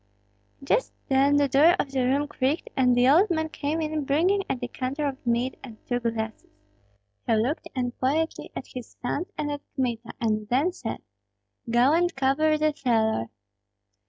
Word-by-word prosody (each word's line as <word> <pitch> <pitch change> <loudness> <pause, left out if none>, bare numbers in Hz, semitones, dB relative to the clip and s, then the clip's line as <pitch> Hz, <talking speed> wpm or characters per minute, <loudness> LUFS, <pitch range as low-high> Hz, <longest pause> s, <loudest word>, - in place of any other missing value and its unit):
Just - - 0
then 275 +1 +4
the 285 -1 +4
door 295 +6 +5
of 275 - -2
the 265 -2 0
room 275 +4 +1
creaked, 285 +2 -1
and 250 -2 +3
the 245 +1 +4
old 345 +10 +5
man 315 -2 0
came 305 +1 -2
in 310 -1 -2
bringing 340 +9 +2
a - - +1
decanter 255 +4 -3
of 270 -2 -5
mead 240 +2 0
and 235 -5 -10
two 245 -1 -1
glasses. 225 -2 -4 0.8
He 225 - +3
looked 245 +8 -1
unquietly 260 +5 -1
at - - -5
his 250 -2 -9
sons 290 +8 -2
and 295 -1 -2
at 290 -1 -4
Kmita, 240 -3 -2
and 215 -3 -1
then 280 +9 +2
said, - - -6 0.7
"Go 240 +5 +4
and 350 +1 +2
cover 275 +3 +2
the 305 0 +1
cellar." 225 - +1
270 Hz, 165 wpm, -26 LUFS, 245-305 Hz, 0.8 s, door